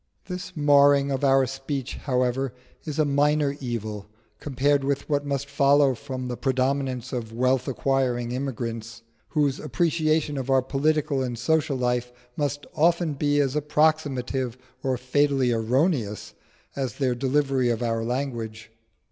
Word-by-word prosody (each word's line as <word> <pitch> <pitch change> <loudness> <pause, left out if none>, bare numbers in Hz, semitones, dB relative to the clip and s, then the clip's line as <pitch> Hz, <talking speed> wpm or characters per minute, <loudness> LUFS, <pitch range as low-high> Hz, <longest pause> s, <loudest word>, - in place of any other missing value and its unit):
This 180 -1 -7
marring 140 -1 +5
of 135 +1 -2
our 135 -1 +4
speech, 135 0 -4
however, 125 -1 -1 0.3
is 150 -2 -4
a 155 - +3
minor 145 0 +2
evil 110 -5 -4 0.3
compared 140 0 +1
with 140 0 -1
what 145 -1 0
must 140 0 -2
follow 140 -1 +4
from 130 +1 -6
the 125 - -3
predominance 130 -1 -1
of 115 -3 -4
wealth 130 +2 +1
acquiring 130 -3 0
immigrants, 115 -3 -4 0.3
whose 145 -4 +1
appreciation 155 -3 0
of 130 0 -5
our 135 -1 +4
political 145 +1 0
and 125 -2 -3
social 150 +2 +1
life 125 -1 -1 0.2
must 145 -1 -2
often 170 0 +2
be 145 +1 +1
as 140 -1 +1
approximative 145 -5 0 0.2
or 130 -1 0
fatally 135 0 +1
erroneous 115 - 0 0.4
as 130 -5 -3
their 130 -3 +1
delivery 135 0 +1
of 120 0 -1
our 115 -1 -1
language. 115 -4 -4
135 Hz, 140 wpm, -25 LUFS, 125-145 Hz, 0.4 s, marring